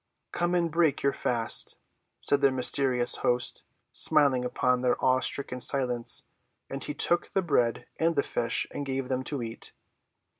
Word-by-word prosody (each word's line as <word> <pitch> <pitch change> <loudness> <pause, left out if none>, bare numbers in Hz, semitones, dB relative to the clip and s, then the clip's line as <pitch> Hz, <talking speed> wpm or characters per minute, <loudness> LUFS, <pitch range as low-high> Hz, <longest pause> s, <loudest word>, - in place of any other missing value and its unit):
"Come 175 +1 -1
and 170 -2 -1
break 160 -3 0
your 140 - +1
fast," 115 -2 -1 0.4
said 145 0 +2
their 140 -1 +3
mysterious 125 -1 +3
host, 120 0 -1 0.3
smiling 135 -4 +4
upon 125 0 -1
their 125 -1 +1
awe‐stricken 130 0 -1
silence. 125 -3 +2 0.5
And 135 0 -5
he 150 - -5
took 175 0 +2
the 195 - 0
bread 120 -8 -1
and 165 0 0
the 140 - +1
fish 115 0 -2
and 145 - -6
gave 135 -1 -4
them 130 0 -2
to 140 -5 -4
eat. 115 0 -8
130 Hz, 155 wpm, -27 LUFS, 125-145 Hz, 0.5 s, smiling